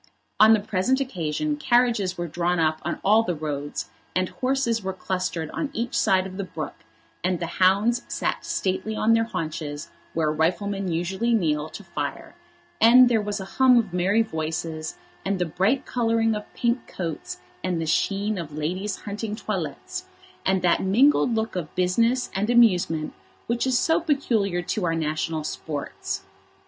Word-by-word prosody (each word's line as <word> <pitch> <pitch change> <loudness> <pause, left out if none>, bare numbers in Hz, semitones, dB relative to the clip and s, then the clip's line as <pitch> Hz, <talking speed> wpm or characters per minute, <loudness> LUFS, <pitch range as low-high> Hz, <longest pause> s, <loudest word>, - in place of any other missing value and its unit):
On 220 +1 +8
the - - 0
present 205 +6 0
occasion 260 - -2
carriages 240 -9 +2
were 175 0 -3
drawn 175 +2 0
up 155 -1 +1
on - - -3
all 215 +3 +5
the 180 -6 -2
roads, 145 -2 -4 0.2
and 185 0 +1
horses 255 -3 0
were 190 -1 -3
clustered 185 -4 -3
on 295 - -2
each 230 +1 -3
side 190 -1 +3
of 190 0 -7
the 200 - -2
brook, 185 - -6 0.5
and 185 -1 0
the 170 - -2 0.2
hounds 205 +6 +4
sat - - -2
stately 195 +3 -2
on 220 +1 +3
their 225 0 +3
haunches 155 -7 -5 0.2
where 155 -2 +2
riflemen 195 +5 0
usually 190 +8 0
kneel 155 -6 0
to - - -9
fire, - - -5 0.5
and 245 +2 +8
there 225 -3 +3
was 205 0 -3
a 190 - -5
hum 255 +5 +4
of 215 -6 +1
merry 195 +5 +3
voices, 160 -3 -4 0.3
and 195 0 0
the 180 - 0
bright 195 - +1
colouring 225 -2 +1
of 210 -1 -6
pink 240 +1 0
coats, 165 -4 -5 0.3
and 180 -2 -1
the 165 - -2
sheen 200 +5 0
of 155 -3 -7
ladies' 185 +7 -2
hunting 210 +1 -4
toilettes, - - -4 0.4
and 190 -1 +1
that 175 - +3
mingled 240 +5 +4
look 220 -1 -2
of 170 -4 -5
business 230 +8 +2
and 200 +3 -1
amusement 180 -10 +3 0.3
which 235 +2 0
is 255 -1 +3
so 320 +6 +3
peculiar 230 - 0
to 190 +3 -2
our 165 -1 +1
national 155 0 -1
sports. 150 -1 -4
190 Hz, 165 wpm, -25 LUFS, 170-230 Hz, 0.5 s, On